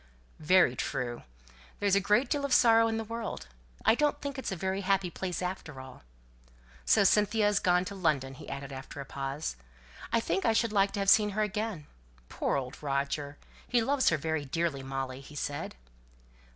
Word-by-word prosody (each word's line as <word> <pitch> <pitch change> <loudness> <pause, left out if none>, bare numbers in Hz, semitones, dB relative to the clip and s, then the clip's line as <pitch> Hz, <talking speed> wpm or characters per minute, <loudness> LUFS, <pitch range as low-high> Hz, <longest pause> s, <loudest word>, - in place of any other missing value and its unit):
"Very 160 -4 +4
true. 125 -4 -3 0.6
There - - -3
is 200 - +3
a - - +5
great 210 +6 +2
deal 285 +2 -1
of 280 -2 +2
sorrow 230 -1 +6
in 225 0 -1
the 225 - -2
world. 230 +1 -5 0.4
I - - +6
don't 295 +4 +1
think 280 -1 -5
it's 265 - -4
a - - -2
very 190 +2 -2
happy 195 -2 +1
place 185 0 -4
after 180 -6 -5
all. 130 -1 -11 0.8
So 210 - +5
Cynthia 210 +2 +3
is 205 -1 +2
gone 180 0 +2
to 200 - -6
London?" 150 -8 0
he 140 - -11
added, 140 0 -6
after 135 +2 -8
a 140 - -5
pause. 135 - -4 0.5
"I 230 - +3
think 190 -4 -1
I 225 - +3
should 225 -1 +1
like 200 -1 +3
to - - -3
have 195 -1 +1
seen 210 -1 +5
her 215 - +3
again. 210 -5 -3 0.4
Poor - - -1
old 130 -1 -6
Roger! 140 0 -2 0.3
He 245 - +2
loves 275 +2 +3
her 165 - +1
very 160 0 -2
dearly, 155 0 -1
Molly," 135 0 -4
he 145 +2 -13
said. 145 0 -4
185 Hz, 195 wpm, -30 LUFS, 140-215 Hz, 0.8 s, sorrow